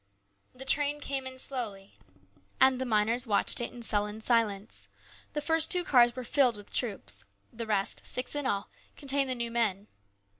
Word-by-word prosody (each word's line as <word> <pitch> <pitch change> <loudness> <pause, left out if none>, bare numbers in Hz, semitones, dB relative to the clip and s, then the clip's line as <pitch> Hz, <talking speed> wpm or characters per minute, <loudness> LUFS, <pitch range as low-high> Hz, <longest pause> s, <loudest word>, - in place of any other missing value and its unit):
The 260 +1 -9
train 290 +1 +4
came 275 -2 -3
in 260 0 -7
slowly, 220 -8 -3 0.7
and 260 -1 +4
the 260 - -2
miners 230 +3 +1
watched 205 +2 +2
it 240 - -3
in 240 - -10
sullen 210 -1 -1
silence. 220 -3 -1 0.5
The 300 - -2
first 320 +2 +1
two 360 -1 +5
cars 240 -6 +4
were 255 - -5
filled 245 -2 +2
with 205 - -13
troops. 195 - -1 0.3
The 230 0 -5
rest, 200 -2 0
six 250 - -1
in 290 -2 -2
all, 200 -4 -2 0.3
contained 275 -1 0
the 255 - +1
new 235 -1 -2
men. 210 -4 -1
240 Hz, 175 wpm, -29 LUFS, 210-265 Hz, 0.7 s, two